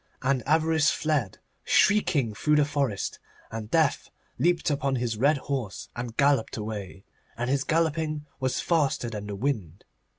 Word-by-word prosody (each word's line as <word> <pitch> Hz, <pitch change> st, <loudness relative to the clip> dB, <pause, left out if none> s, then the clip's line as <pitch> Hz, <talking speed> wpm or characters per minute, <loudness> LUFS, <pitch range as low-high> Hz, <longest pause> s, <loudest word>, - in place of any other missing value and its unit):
And 130 Hz, -1 st, +2 dB
Avarice 160 Hz, 0 st, +3 dB
fled 145 Hz, -11 st, -1 dB, 0.3 s
shrieking 150 Hz, -, +3 dB
through 130 Hz, +10 st, +2 dB
the 150 Hz, -1 st, +4 dB
forest, 140 Hz, -8 st, -2 dB, 0.3 s
and 110 Hz, -1 st, -6 dB
Death -, -, +1 dB, 0.3 s
leaped 170 Hz, +2 st, +2 dB
upon 140 Hz, -2 st, 0 dB
his 120 Hz, -2 st, -1 dB
red 140 Hz, +7 st, +3 dB
horse 130 Hz, -7 st, -4 dB
and 120 Hz, -1 st, -6 dB
galloped 140 Hz, -5 st, +2 dB
away, 105 Hz, -3 st, -6 dB, 0.3 s
and 120 Hz, +2 st, -1 dB
his 140 Hz, -1 st, +1 dB
galloping 155 Hz, -1 st, 0 dB
was 130 Hz, -1 st, 0 dB
faster 145 Hz, -8 st, +1 dB
than 105 Hz, -2 st, -5 dB
the 100 Hz, -, -4 dB
wind. 100 Hz, -, -3 dB
135 Hz, 145 wpm, -27 LUFS, 110-150 Hz, 0.3 s, the